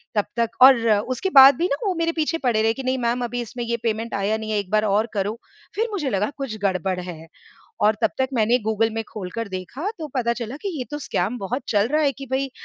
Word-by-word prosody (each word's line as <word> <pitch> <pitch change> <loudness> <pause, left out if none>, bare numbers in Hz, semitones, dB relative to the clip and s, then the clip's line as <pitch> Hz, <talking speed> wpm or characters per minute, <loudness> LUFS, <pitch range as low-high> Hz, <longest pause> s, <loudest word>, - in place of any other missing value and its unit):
तब 210 - +2
तक 230 -1 +1
और 265 0 +10 0.3
उसके 380 +10 -1
बाद 270 0 +10
भी 345 - +1
ना, 280 - 0
वो 375 - +1
मेरे 330 0 0
पीछे 320 +1 0
पड़े 235 -4 +1
रहे 225 0 +3
कि, 270 - -7
"नहीं 260 +1 0
मैम, 240 +1 0
अभी 245 +1 -3
इसमें 240 +1 -6
ये 235 0 -1
पेमेंट 225 0 -2
आया 200 +2 0
नहीं 220 0 -5
है, 210 - +1
एक 190 -2 -6
बार 215 0 +3
और 210 +3 +2
करो। 205 +1 -1 0.4
फिर 450 +3 0
मुझे 310 -10 -2
लगा, 205 +1 0
कुछ 270 -6 -4
गड़बड़ 185 -1 0
है 165 -3 -8 0.6
और 210 0 +4
तब 220 - +3
तक 260 0 +1
मैंने 235 +2 +3
गूगल 220 +1 +1
में 225 - -1
खोलकर 210 +2 -5
देखा, 200 - -5
तो 310 -2 -5
पता 235 -1 +1
चला 235 +2 -5
कि 400 - -2
ये 250 - -3
तो 295 - -2
स्कैम 220 -4 -2
बहुत 245 +8 -3
चल 210 +1 +2
रहा 310 0 +3
है 280 -2 +2
कि 275 +2 -9
भई, 270 0 0
235 Hz, 250 wpm, -23 LUFS, 210-265 Hz, 0.6 s, और